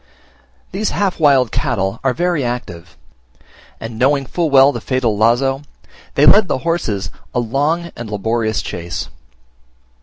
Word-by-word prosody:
These 210 +3 -1
half 195 -4 0
wild 135 -6 +4
cattle 110 - -1
are 130 -2 +1
very 175 -4 0
active; 90 -9 -6 0.8
and 115 0 -7
knowing 135 +2 +2
full 170 +3 -1
well 135 0 +6
the 120 -4 -6
fatal 125 -3 0
lazo, 120 +5 +2 0.5
they 145 - +4
led 205 +3 +6
the - - 0
horses 105 - -1 0.2
a - - +2
long 145 +8 -1
and 115 -2 -7
laborious 110 +2 -1
chase. 85 0 -5
130 Hz, 140 wpm, -17 LUFS, 110-150 Hz, 0.8 s, well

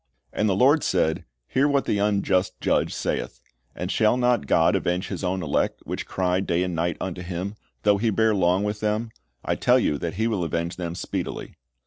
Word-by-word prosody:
"And 105 - +1
the 95 - +2
Lord 140 +9 +4
said. 80 -4 +1 0.2
Hear 135 +3 +2
what 140 -1 +1
the 100 - 0
unjust 100 -2 +1
judge - - +1
saith. - - -3 0.4
And 90 +2 -3
shall 110 +2 +3
not 125 - +2
God - - +4
avenge 90 +2 -1
His - - -5
own 95 0 -1
elect, 75 - 0
which - - -4
cry 90 -1 0
day 90 -2 0
and 90 -1 -2
night 85 0 -1
unto 90 -1 -4
Him, 90 +3 -4 0.3
though 105 -1 +4
He 115 +2 +1
bear 110 +1 +2
long 95 0 +2
with 105 0 -2
them? 110 +2 -1 0.3
I - - +1
tell - - +3
you 75 - +1
that 85 0 -4
He 110 +3 0
will 105 -6 0
avenge 85 +1 -2
them 85 -2 -4
speedily." - - -4
95 Hz, 200 wpm, -24 LUFS, 90-105 Hz, 0.4 s, Lord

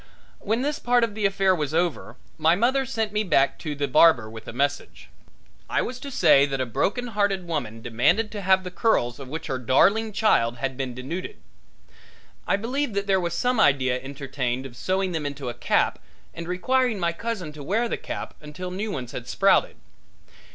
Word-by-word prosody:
When 225 +5 -1
this 295 +1 -1
part 245 0 +2
of 230 -3 0
the 210 -1 +1
affair 195 -1 +2
was 155 -3 -2
over 170 -1 -1 0.2
my 165 +2 +4
mother 260 +6 +1
sent 220 -2 -2
me 210 +1 0
back 155 -8 +2
to 150 -3 -4
the 145 0 -1
barber 130 -4 +5
with 110 0 -10
a - - -5
message. 140 +4 -2 0.6
I - - +1
was 250 0 -5
to 280 - -7
say 140 - +5
that 135 -1 -3
a - - +1
heart 115 - -14
broken 205 - 0
woman 125 -9 -4
demanded 165 - +1
to 210 - -5
have 190 0 +3
the 180 - -6
curls 145 - +1
of 135 - -8
which 155 +5 -6
her 130 -3 -3
darling 200 - +3
child 125 - +2
had 130 +2 -3
been 130 -2 -4
denuded. 165 - -6 1.1
I - - +3
believe 240 +3 -2
that 200 0 0
there 195 -1 +2
was 170 -1 -2
some 250 -2 +1
idea 130 - +3
entertained 135 -2 -4
of 125 -3 -9
sewing 185 +8 -1
them 160 -4 -2
into 140 -3 -5
a - - -4
cap - - +1 0.3
and 170 0 -7
requiring 245 +6 +1
my 170 -1 0
cousin 190 -6 -4
to 150 - -10
wear 220 +10 0
the - - -2
cap - - -6
until 155 +5 -7
new 205 +4 -3
ones 125 -8 -5
had 120 - -7
sprouted. 195 0 +3
175 Hz, 200 wpm, -25 LUFS, 135-215 Hz, 1.1 s, barber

